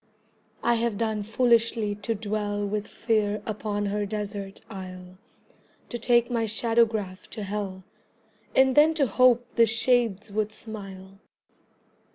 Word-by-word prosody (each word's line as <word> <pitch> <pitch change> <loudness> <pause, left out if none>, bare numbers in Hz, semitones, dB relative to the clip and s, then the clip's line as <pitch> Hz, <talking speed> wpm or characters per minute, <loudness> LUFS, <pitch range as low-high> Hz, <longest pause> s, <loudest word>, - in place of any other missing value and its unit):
I 235 - +3
have 230 -2 -1
done 220 -1 -1
foolishly 225 -1 +2
to 225 +2 -3
dwell 205 -1 -2
With 210 +1 -3
Fear 215 -2 0
upon 205 -1 -2
her 205 +1 -1
desert 205 -1 -5
isle, 185 -2 -9 0.7
To 240 - -4
take 240 +1 +3
my 230 -2 +1
shadowgraph 220 -3 0
to 215 - -6
Hell, 195 -2 -4 0.7
And 265 0 +5
then 310 +2 +6
to 290 -3 +3
hope 245 +1 +4
the 230 -1 +5
shades 225 -2 +1
would 215 +1 -1
smile. 195 -3 -8
215 Hz, 130 wpm, -26 LUFS, 205-230 Hz, 0.7 s, then